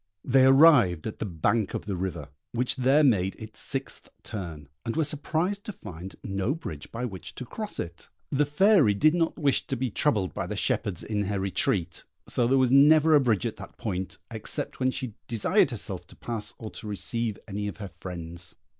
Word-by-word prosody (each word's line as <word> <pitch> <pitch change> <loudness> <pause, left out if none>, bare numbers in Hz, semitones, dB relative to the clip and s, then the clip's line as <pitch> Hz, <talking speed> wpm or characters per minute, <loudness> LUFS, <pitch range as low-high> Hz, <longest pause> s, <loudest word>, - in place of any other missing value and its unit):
They 130 +1 +5
arrived 135 - +6
at 110 - -5
the - - -2
bank 95 +5 0
of - - -4
the 100 -2 -2
river, 85 -5 -4 0.2
which 125 +3 0
there 135 +4 +4
made 100 -8 +3
its 110 -1 -8
sixth 135 -1 -3
turn, 85 - -6 0.2
and 115 - -3
were 160 - +2
surprised 160 +7 -1
to - - -3
find 90 - -9
no 100 +8 -1
bridge 80 - -8
by 120 +2 -3
which 95 -7 -7
to 125 - -6
cross 215 - -6
it. 85 0 -6 0.2
The 145 +1 +2
Fairy 150 - +5
did 155 +9 +4
not 165 -2 0
wish 145 -6 +1
to - - -2
be 125 -1 -2
troubled 105 -7 +1
by - - -3
the - - -4
shepherds 95 -5 -1
in 105 -2 -1
her 100 0 -1
retreat, 95 -2 0 0.2
so 120 - +2
there 135 +2 +3
was 130 -2 +3
never 155 +3 +6
a 145 - +7
bridge 115 -8 +1
at - - -3
that - - -11
point, 95 -4 -4
except 110 -2 -3
when 130 0 +2
she 130 -3 -4
desired 115 -3 +3
herself - - -4
to - - -15
pass 110 -3 -5
or 110 -2 -7
to 110 - -8
receive 110 +1 -2
any 105 0 -3
of 105 - -6
her 100 -4 -7
friends. 85 -1 -6
110 Hz, 200 wpm, -27 LUFS, 95-135 Hz, 0.2 s, a